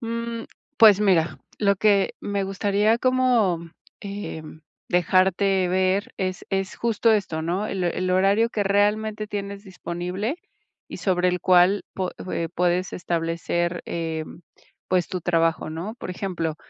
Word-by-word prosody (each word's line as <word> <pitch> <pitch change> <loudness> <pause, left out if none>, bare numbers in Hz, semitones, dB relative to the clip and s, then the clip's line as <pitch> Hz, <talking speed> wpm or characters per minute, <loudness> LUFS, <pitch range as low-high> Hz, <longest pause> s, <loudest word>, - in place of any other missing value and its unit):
Mm, 230 0 -4 0.3
pues, 210 -5 +7
mira, 180 -5 +2 0.2
lo 200 -1 +2
que 200 -1 +3
me 200 -1 -2
gustaría 205 +3 +1
como, 250 -9 +2 0.4
eh, 200 -5 -6 0.5
dejarte 185 +1 +2
ver 185 +2 +1
es 185 -1 -3
es 195 -1 -1
justo 230 -1 +2
esto, 170 -7 -1
¿no?, 185 +6 -1
el 190 -2 -2
el 185 +1 -1
horario 195 +5 +3
que 210 -3 -2
realmente 210 +2 +1
tienes 200 -1 -5
disponible, 185 - -4 0.5
y - - -7
sobre 180 -2 +1
el 180 0 -1
cual 185 +2 +4
po 185 -1 -2 0.2
eh, 165 -1 -2
puedes 180 +1 0
establecer, 170 0 -2
eh, 160 -2 -3 0.6
pues 180 -2 +2
tu 185 - -3
trabajo, 165 -2 +1
¿no? 170 +8 -5
Por 205 - -7
ejemplo, 175 -4 -3
190 Hz, 135 wpm, -24 LUFS, 175-205 Hz, 0.6 s, pues